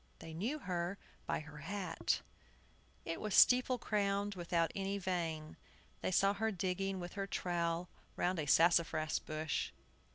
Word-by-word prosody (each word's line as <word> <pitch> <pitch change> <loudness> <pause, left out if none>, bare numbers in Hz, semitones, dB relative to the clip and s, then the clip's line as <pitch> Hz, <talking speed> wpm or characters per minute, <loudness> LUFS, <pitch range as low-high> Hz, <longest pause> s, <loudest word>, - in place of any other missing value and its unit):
They 160 - -9
knew 225 - -1
her 180 - -2 0.3
by - - 0
her 150 -1 -11
hat. 180 +1 -1 0.8
It 165 - -3
was 215 -3 -1
steeple 255 0 +6
crowned, 205 -2 0
without 170 -2 0
any 195 0 -1
vane. 170 -5 -2 0.4
They - - 0
saw 195 +2 +4
her 220 +2 0
digging 195 0 -1
with 175 -1 -6
her 195 -1 -3
trowel 170 -2 -1 0.3
round 180 -1 0
a 150 - -2
sassafras 165 -1 +4
bush. 155 0 -2
180 Hz, 140 wpm, -36 LUFS, 165-200 Hz, 0.8 s, steeple